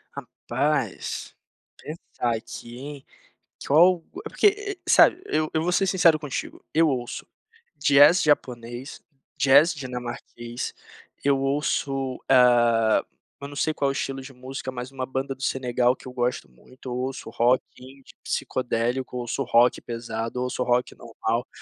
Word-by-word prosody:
Rapaz, - - -3 0.4
pensar 125 -6 -4
aqui 120 +1 -8
em. 140 +2 -8 0.6
Que - - -9
col 170 +4 +5 0.2
é - - -5
porque, 410 -1 +1
sabe, 355 - +6
eu 155 - 0
eu 160 - +1
vou 180 - 0
ser 195 +2 +2
sincero 170 -4 +4
contigo. 150 -3 -6
Eu 165 +1 +4
ouço 125 -3 -4 0.5
jazz 145 +6 +6
japonês, 125 -3 -1 0.4
jazz 140 +3 +5
dinamarquês, 125 -3 -6 0.5
eu 140 -1 +3
ouço, 135 -1 -1
hã, 120 -3 +4 0.4
eu 140 - -5
não 145 - -10
sei 155 +2 0
qual 140 -2 0
o - - +1
estilo 135 0 -3
de 135 +1 -11
música, 130 +1 -7
mas 125 0 -7
uma 130 -1 -4
banda 135 +1 -3
do 130 - -18
Senegal 125 -1 +1
que - - -14
eu 125 - -8
gosto 125 - -2
muito, 130 - -12
ouço 130 +2 -4
rock, 125 +2 +3 0.2
indie, 130 +1 -15
psicodélico, 125 +1 -2
ouço 120 -2 -3
rock 120 +1 +3
pesado, 115 0 -4
ouço 125 0 -3
rock 125 0 +1
normal. 115 +1 -3
130 Hz, 140 wpm, -25 LUFS, 120-145 Hz, 0.6 s, sabe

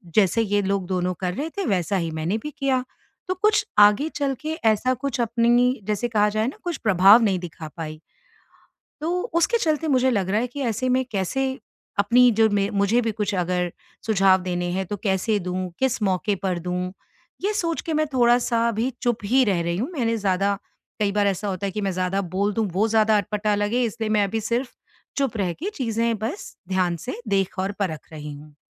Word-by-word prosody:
जैसे 210 +1 +4
ये 205 -1 +1
लोग 195 -1 -1
दोनों 180 -1 -1
कर 180 -1 -1
रहे 305 +7 -3
थे, 395 - -1
वैसा 195 0 0
ही 165 -3 -2
मैंने 160 +7 -1
भी 300 - -5
किया। 265 -2 +1 0.4
तो 370 - 0
कुछ 425 0 +3
आगे 210 +9 +6
चल 280 -2 0
के 310 +1 -3
ऐसा 220 +4 +3
कुछ 255 -1 -2
अपनी 240 +2 +2
जैसे 210 +3 0
कहा 210 -2 +2
जाए 215 +2 0
ना, 270 - -5
कुछ 345 -4 -3
प्रभाव 200 +2 +6
नहीं 195 -4 +2
दिखा 165 -3 -8
पाई। 155 -1 -6 1.0
तो 320 - -1 0.2
उसके 340 +8 +3
चलते 315 -4 0
मुझे 260 -2 +3
लग 200 -6 0
रहा 210 - +2
है 245 - 0
कि 250 +4 -8
ऐसे 235 +1 -1
में, 255 +1 +2
कैसे 265 +8 -1 0.4
अपनी 240 +5 +5
जो 220 -1 +6
मैं 200 -1 +1
मुझे 200 +3 +2
भी 225 -2 -1
कुछ 210 -1 -2
अगर 180 -1 -1 0.3
सुझाव 195 -3 +4
देने 175 -1 -2
हैं, 190 0 -2
तो 205 - -4
कैसे 200 +2 0
दूँ, 185 0 -3
किस 260 -2 0
मौके 195 +1 +1
पर 185 -2 0
दूँ? 180 +1 -3 0.5
ये 410 - +1
सोच 335 -5 -1
के 325 - -3
मैं 310 0 +2
थोड़ा-सा 240 -1 +3
अभी 230 +3 0
चुप 240 -3 +1
ही 260 +5 +4
रह 195 -6 +1
रही 170 0 -1
हूँ। 235 +9 -2
मैंने 230 -6 0
ज़्यादा 200 -1 0 0.4
कई 200 -2 +2
बार 205 0 +2
ऐसा 200 +1 -1
होता 195 0 -2
है - - -2
कि 210 - -3
मैं 195 - -1
ज़्यादा 185 +2 -1 0.2
बोल 205 +1 +1
दूँ, 225 0 +1
वो 205 +5 +2
ज़्यादा 220 -1 +3
अटपटा 210 +1 0
लगे, 205 +4 0
इसलिए 225 -1 -3
मैं 210 -1 +3
अभी 220 +3 -2
सिर्फ़ 240 +4 -1 0.5
चुप 270 -5 0
रह 185 -4 0
के 360 - -5
चीज़ें 230 -3 0
बस 240 - -5
ध्यान 185 -2 +1
से 250 - -4
देख 195 -2 0
और 190 +2 -1
परख 160 -6 -3
रही 150 -1 -7
हूँ। 150 +1 -14
210 Hz, 210 wpm, -23 LUFS, 190-245 Hz, 1.0 s, आगे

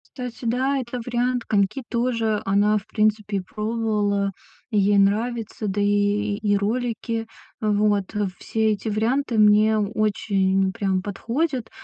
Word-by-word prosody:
Кстати, 250 -2 -7
да, 255 +4 +1
это 250 -1 -4
вариант. 245 0 0
Коньки 205 +6 +1
тоже 230 -3 0
она, 205 +2 +3
в 200 - -4
принципе, 210 -2 0
пробовала, 210 -1 -1 0.4
и 215 - +1
ей 200 0 +4
нравится. 220 +2 0
Да 200 +1 -1
и 205 0 +1
и 205 -1 +1
ролики. 230 +1 -2 0.4
Вот. 205 -2 +1 0.2
Все 220 -1 0
эти 210 +2 -4
варианты 230 +3 0
мне 215 +1 +5
очень 200 -2 +1
прям 190 -2 0
подходят. 235 - -2
215 Hz, 125 wpm, -23 LUFS, 205-235 Hz, 0.4 s, мне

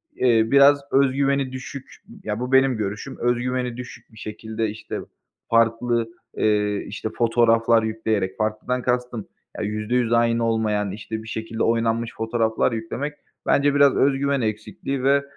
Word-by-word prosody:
eee, 115 -3 +4
biraz 140 +1 +6
öz 135 -1 +4
güveni 140 -1 +1
düşük, 130 +1 -8 0.3
ya 105 0 -3
bu 125 +1 -4
benim 130 -2 +4
görüşüm, 105 +5 -4
öz 120 +1 +2
güveni 125 -1 -2
düşük 125 -2 -10
bir - - -16
şekilde 110 +1 -4
işte 110 +2 -6 0.5
farklı, 115 0 +2 0.3
eee, 105 -1 +2
işte 105 +2 -4
fotoğraflar 115 -1 +3
yükleyerek, 110 -3 -1
farklıdan 110 +4 -1
kastım, 125 -3 -2 0.3
ya - - -3
%100 110 +3 0
aynı 115 0 +2
olmayan, 105 -3 0
işte 110 +2 -6
bir - - -12
şekilde 110 0 -3
oynanmış 115 0 0
fotoğraflar 110 +1 0
yüklemek, 115 +6 -4 0.3
bence 140 0 +3
biraz 145 -1 +5
öz 140 +1 +3
güven 140 -1 +1
eksikliği 110 +4 -3
ve, 140 +1 +3
115 Hz, 150 wpm, -23 LUFS, 110-130 Hz, 0.5 s, biraz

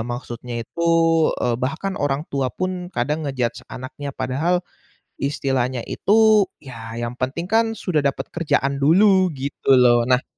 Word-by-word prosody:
maksudnya 120 -1 -5
itu, 170 +8 -3 0.5
eee, 120 -1 +1
bahkan 160 +10 -2
orang 145 0 0
tua 135 -2 0
pun 185 +4 -4
kadang 150 +6 -1
nge-judge 125 -4 -2
anaknya 130 +3 -7
padahal, 165 +8 0 0.6
istilahnya 130 -3 -1
itu 215 -1 +3 0.2
ya 115 -4 -9
yang 120 0 -3
penting 130 +6 -2
kan 225 +4 +1
sudah 180 -7 -1
dapat 140 -1 -2
kerjaan 145 -4 0
dulu 190 +6 +5
gitu 135 0 +1
loh. 120 -2 +4
Nah, 125 0 +3
140 Hz, 140 wpm, -21 LUFS, 125-175 Hz, 0.6 s, dulu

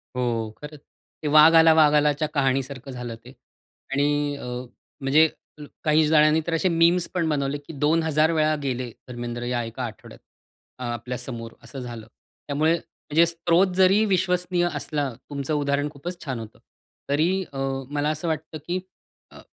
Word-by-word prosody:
हो, 115 -3 -1
खरंच. 150 0 -9 0.4
ते 150 - -1
वाघ 155 +2 +7
आला, 160 0 +7
वाघ 155 -2 +5
आलाच्या 150 0 +2
कहाणीसारखं 135 -1 -1
झालं 125 -2 -6
ते - - -11 0.6
आणि 145 +1 +1
अ, - - -8 0.6
म्हणजे 150 +4 +5 0.3
ज 150 - -8 0.2
काही 155 0 +4
जणांनी 155 0 +5
तर 170 - -1
असे 175 +3 +2
मीम्स 170 +1 +3
पण 170 -3 0
बनवले 140 -1 -1
की 145 +3 -12
2000 155 +2 +2
वेळा 155 -1 +2
गेले 130 -2 -2 0.2
धर्मेंद्र, 120 -1 -5
या 120 0 -1
एका 115 +3 -6
आठवड्यात, 110 -3 -9 0.6
आपल्या 120 0 -4
समोर 120 -3 -6
असं 135 - -9
झालं. 120 -3 -8 0.4
त्यामुळे, 150 +3 +2
म्हणजे 165 -1 0
स्रोत 170 +2 +2
जरी 190 +3 +5
विश्वसनीय 180 -2 +1
असला 145 -3 -2 0.2
तुमचं 140 +1 -3
उदाहरण 145 0 0
खूपच 170 +5 -7
छान 130 -5 -3
होतं 110 -1 -10 0.5
तरी 175 +7 +1
अं, 135 0 -2
मला 145 +1 0
असं 155 +2 -3
वाटतं, 155 0 -3
की 180 +1 -1 0.5
अं - - -13
150 Hz, 155 wpm, -24 LUFS, 135-160 Hz, 0.6 s, वाघ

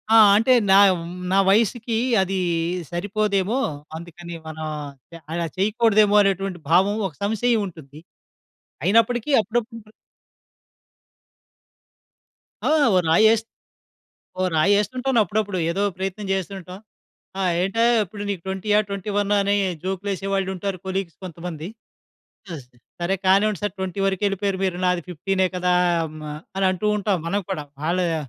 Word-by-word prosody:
ఆ! - - +9 0.2
అంటే, 225 +5 +4 0.2
నావ్ 195 0 +7
హ్మ్, 170 +1 -8 0.2
నా 190 - +3
వయసుకి 225 +3 +1 0.3
అది 190 0 -1 0.5
సరిపోదేమో! 200 +4 0 0.4
అందుకని 170 +1 -9
మనం 155 0 -6 0.5
య - - -8
అలా 170 +1 -1
చేయకూడదేమో 210 +1 +3
అనేటటువంటి 195 -2 -1
భావం, 190 +5 +4
ఒక 160 - -12
సంశయం 220 +3 +1
ఉంటుంది. 155 -5 -12 0.8
అయినప్పటికీ, 230 +5 +2
అప్పుడప్పుడు 225 0 -4 2.7
ఆ! - - +2 0.3
ఓ - - +5
రాయేస్త్ 220 +6 +4 0.9
ఓ - - +2
రాయేస్తుంటాను 230 +9 +2
అప్పుడప్పుడు. 205 0 -2
ఏదో 195 +4 -1
ప్రయత్నం 195 +2 -4
జేస్తూ 190 -1 -1
ఉంటాం. 185 +1 -10 0.6
"ఆ! - - 0 0.2
ఏంటయ్యా 230 +6 +2
ఇప్పుడు 205 +3 -8
నీకు 195 -4 -3
ట్వెంటీయా, 200 +2 +1
ట్వెంటీ 200 0 -5
వన్నా? 205 0 +1
అని" 200 +1 +2 0.3
జోకులేసేవాళ్లుంటారు 195 0 -2
కొలీగ్స్ 190 -3 -3
కొంతమంది. 170 -2 -7 0.9
అస్‌డ్ 125 -4 -13 0.3
సరే 180 +3 +1
కానివ్వండి 200 +1 +3
సార్! 205 - -1
20 190 0 -4
వరుకెళిపోయారు 195 0 0
మీరు. 185 -2 -1
నాది 180 -1 +1
15 190 +3 0
కదా! 180 0 +1 0.8
అని 195 0 +1
అంటూ 185 +3 -2
ఉంటాం 205 -2 0
మనం 200 +4 0
కూడా. 160 -6 -3 0.2
ఆళ్ళయ 175 -1 +1
195 Hz, 120 wpm, -22 LUFS, 180-210 Hz, 2.7 s, ఆ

